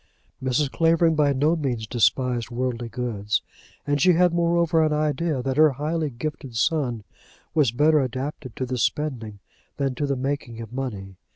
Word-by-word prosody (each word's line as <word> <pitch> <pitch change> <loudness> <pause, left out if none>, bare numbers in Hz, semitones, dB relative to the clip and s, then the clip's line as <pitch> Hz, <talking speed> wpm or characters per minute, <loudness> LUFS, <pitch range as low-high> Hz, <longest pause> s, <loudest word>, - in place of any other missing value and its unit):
Mrs. 130 +2 +1
Clavering 165 0 +3
by 150 -2 +3
no 145 +5 +2
means 125 -8 -2
despised 120 0 +1
worldly 120 -1 -3
goods; 110 -4 -2 0.4
and 145 -1 0
she 185 - +6
had, 175 0 +3
moreover, 170 -1 +2
an 155 - +1
idea 150 -2 0
that 135 +1 -2
her 155 -2 +6
highly 155 +3 -2
gifted 135 0 -6
son 125 -6 0 0.5
was 150 -8 +3
better 150 +5 +4
adapted 130 -1 -4
to 130 - -2
the 125 0 -3
spending 120 -6 -2 0.4
than 135 -2 0
to 145 +3 -2
the 140 - 0
making 130 -3 -3
of 115 0 -8
money. 100 -8 -5
135 Hz, 165 wpm, -24 LUFS, 120-155 Hz, 0.5 s, she